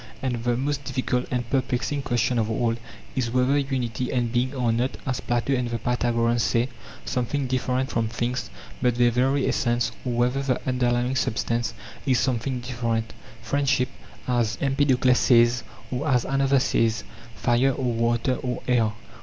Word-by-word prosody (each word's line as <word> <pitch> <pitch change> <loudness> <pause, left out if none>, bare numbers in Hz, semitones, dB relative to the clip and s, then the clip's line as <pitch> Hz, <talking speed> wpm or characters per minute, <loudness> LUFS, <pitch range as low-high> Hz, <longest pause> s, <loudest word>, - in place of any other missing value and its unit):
And 120 -3 -1
the 120 -1 +1
most 140 +2 -1
difficult 130 -2 -1
and 120 -2 -2
perplexing 130 +2 0
question 120 -1 +1
of 110 -1 0
all 115 +1 +1 0.4
is 125 -3 0
whether 125 +3 +2
unity 130 -4 -1
and 120 -3 0
being 125 +3 0
are 125 -3 +1
not, 120 +3 0
as 130 -1 -1
Plato 120 +3 0
and 125 -2 0
the 115 - -1
Pythagoreans 120 0 +1
say, 115 +2 +1 0.4
something 130 +2 -1
different 130 0 -1
from 115 -1 0
things 120 +2 -2 0.3
but 125 -2 +2
their 120 0 +4
very 135 +3 +2
essence, 120 -1 +1
or 125 - -2
whether 125 +3 +1
the 135 -2 0
un 130 -1 0
derlying 120 +1 +1
substance 115 -1 -1 0.3
is 130 -2 +4
something 125 0 -1
different, 115 -2 -2 0.3
friendship, 140 -3 +1 0.4
as 120 -4 +1
Empedokles 135 -2 +3
says, 120 0 +4 0.3
or 130 +4 -2
as 125 -4 +2
another 135 0 +2
says, 115 -3 +1 0.3
fire, 120 +5 +2
or 125 -2 -1
water, 120 +2 +1
or 125 -1 -4
air. 115 -4 +2
125 Hz, 160 wpm, -25 LUFS, 120-130 Hz, 0.4 s, their